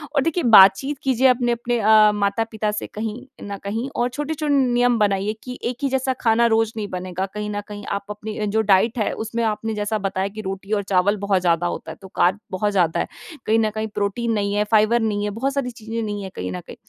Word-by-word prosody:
और 280 - +4
देखिए 330 +2 0
बातचीत 230 +5 +6
कीजिए 265 -1 +3
अपने 245 -1 +2
अपने 240 0 -1
अ, 215 0 +6
माता-पिता 210 +1 -1
से 210 - -4
कहीं 220 +3 -6 0.2
न 200 -1 -5
कहीं 225 +6 -3
और 240 +1 +1
छोटे-छोटे 295 +2 -2
नियम 245 -3 +3
बनाइए 200 0 +1
कि 250 0 -7
एक 245 0 -2
ही 275 - +2
जैसा 265 0 0
खाना 230 +1 +3
रोज़ 225 -1 +1
नहीं 210 -2 -3
बनेगा 185 0 -4
कहीं 210 0 -4
न 205 0 -3
कहीं 205 -1 -8
आप 200 - -30
अपनी 210 +1 -6
जो 220 +2 +1
डाइट 215 +4 +3
है 210 - 0
उसमें 230 +1 -2
आपने 220 0 -1
जैसा 210 +1 -1
बताया 190 0 -2
कि - - -3
रोटी 195 +1 -6
और 205 - +1
चावल 195 +2 +2
बहुत 200 -2 0
ज़्यादा 175 -1 +2
होता 160 - -5
है, - - -10
तो 190 - -10
कार्ब 185 +4 +2
बहुत 205 +3 0
ज़्यादा 175 -5 +1
है, - - -1 0.4
कहीं 225 +1 +3
न 220 - +2
कहीं 220 0 -2
प्रोटीन 215 +4 -1
नहीं 200 -1 -1
है, 205 - +2
फ़ाइबर 220 +2 +4
नहीं 210 -2 -1
है, 210 - -1
बहुत 275 +3 -1
सारी 270 -3 -2
चीज़ें 230 0 -5
नहीं 205 -2 -3
हैं 190 - -7
कहीं 90 0 -4
न 90 -1 -5
कहीं। - - -9
215 Hz, 235 wpm, -22 LUFS, 200-235 Hz, 0.4 s, बातचीत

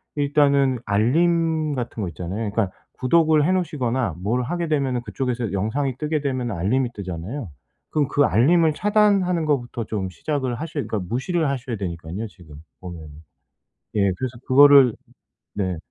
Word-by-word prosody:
일단은 140 -3 +2
알림 160 +8 +2
같은 120 -3 -4
거 95 - -2
있잖아요. 95 +6 -4
그러니까 100 -3 -1 0.3
구독을 155 +3 +3
해 180 - +2
놓으시거나 130 - -1
뭘 120 +6 0
하게 170 +5 -2
되면은 135 -5 0
그쪽에서 125 -3 -3
영상이 120 +7 -1
뜨게 150 +1 -1
되면은 130 -6 -2
알림이 120 +9 0
뜨잖아요. 95 - -6 0.4
그럼 150 -3 +1
그 145 - +2
알림을 155 - +4
차단하는 200 -3 +2
것부터 125 -5 -1
좀 100 -4 -3
시작을 130 - -3
하셔야 155 +1 -4
그러니까 110 - -2
무시를 155 - 0
하셔야 125 -3 -3
되니깐요 90 +2 -5
지금 85 -7 -15 0.3
보면은. 85 -4 -8 0.9
예 100 -2 +3
그래서 130 -2 -4
그거를 140 -2 +7 0.6
네. 95 -3 -2
130 Hz, 365 characters per minute, -22 LUFS, 105-150 Hz, 0.9 s, 그거를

